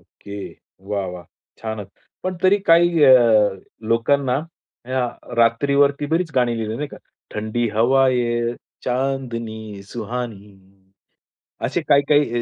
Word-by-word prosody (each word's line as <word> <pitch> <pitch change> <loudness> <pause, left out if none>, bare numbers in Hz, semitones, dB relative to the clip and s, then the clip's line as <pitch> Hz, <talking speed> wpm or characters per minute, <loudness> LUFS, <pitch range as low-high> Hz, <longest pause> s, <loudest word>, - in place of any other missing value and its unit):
Okay. 100 0 -12 0.5
वाह! 100 -2 -1
वाह! 90 -1 -8 0.3
छानच. 110 -3 -5 0.3
पण 185 -1 -3
तरी 190 +2 +5
काही 170 -1 +5
अ, 130 - +8 0.8
लोकांना 125 +3 +2 0.5
अ, 125 -1 -2 0.2
रात्रीवरती 140 +5 +3
बरीच 165 +2 0
गाणी 125 -2 +2
लिहली 110 0 -3
नाही 150 +2 -4
का? - - -11 0.4
ठंडी 110 +2 -1
हवाए, 120 -1 +2 0.3
चांदनी 115 -5 -3
सुहानी. 110 -3 -5 1.1
असे - - -1
काही-काही 140 -4 +3
120 Hz, 105 wpm, -21 LUFS, 110-140 Hz, 1.1 s, अ